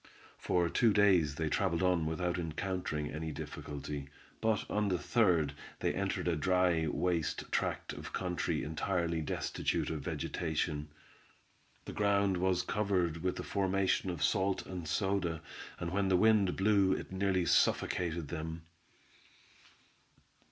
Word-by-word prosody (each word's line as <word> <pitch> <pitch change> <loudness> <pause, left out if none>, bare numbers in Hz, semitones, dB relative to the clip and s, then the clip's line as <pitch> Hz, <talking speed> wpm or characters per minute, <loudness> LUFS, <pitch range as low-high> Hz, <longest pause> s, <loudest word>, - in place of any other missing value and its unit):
For 90 -1 +1
two 110 +5 +3
days 90 -8 +4
they 80 0 -1
traveled 85 +2 0
on 90 -3 +2
without 90 +2 -1
encountering 80 -2 -3
any 80 +1 -4
difficulty; 75 -1 -6 0.3
but 110 -2 +1
on 105 0 0
the 95 -2 +1
third 85 - +2 0.3
they - - 0
entered - - -2
a 85 - +2
dry, 90 -1 +2
waste 85 +1 -1
tract - - -1
of - - -8
country 90 -6 -1
entirely 85 +2 -1
destitute 75 - -1
of 80 -2 -3
vegetation. 75 0 -2 1.0
The - - -6
ground 100 -2 +2
was 90 0 +1
covered 90 -5 0
with 90 +2 -2
a - - -3
formation 95 -1 +1
of 85 -5 -3
salt 95 +6 +1
and 90 -3 -6
soda, 95 -2 0 0.4
and 85 0 -3
when 100 +1 +1
the 95 -1 +4
wind 105 -2 +4
blew 100 -1 +4
it - - -5
nearly 95 -1 +1
suffocated 85 -4 +1
them. 80 0 -5
90 Hz, 135 wpm, -33 LUFS, 80-95 Hz, 1.0 s, days